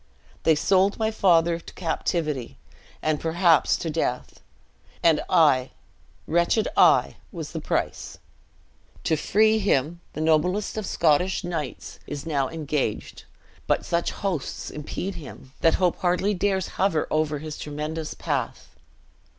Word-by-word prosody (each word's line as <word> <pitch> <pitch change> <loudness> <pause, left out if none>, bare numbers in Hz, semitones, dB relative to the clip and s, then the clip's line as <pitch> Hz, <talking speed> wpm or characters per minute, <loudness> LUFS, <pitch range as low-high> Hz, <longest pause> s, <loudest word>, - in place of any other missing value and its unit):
They 160 - +4
sold 190 +5 +2
my 220 0 0
father 170 -5 +3
to - - -13
captivity, 155 -6 -2 0.5
and, 155 -1 +1
perhaps, 165 -1 +3
to - - -5
death; 135 -5 -2 0.6
and 165 -2 +4
I, 145 -8 +4 0.6
wretched 170 +6 +2
I, - - +4
was - - -6
the - - -4
price. - - -3 0.9
To 160 - +2
free 215 +8 +3
him, 170 -4 0
the 155 - -4
noblest 160 +6 +1
of 215 -3 -3
Scottish 170 +5 +2
knights 165 -6 -5
is 145 0 -6
now 140 -5 0
engaged; 150 -8 -3 0.4
but - - +1
such 170 0 0
hosts 180 -9 -4
impede 165 +6 -5
him, 140 -5 -11
that 165 - +4
hope 180 -2 +1
hardly 180 +3 +1
dares 190 -1 0
hover 190 -5 +2
over 155 -1 +1
his 155 +1 -7
tremendous 150 +1 -5
path." - - -3
165 Hz, 130 wpm, -25 LUFS, 150-185 Hz, 0.9 s, They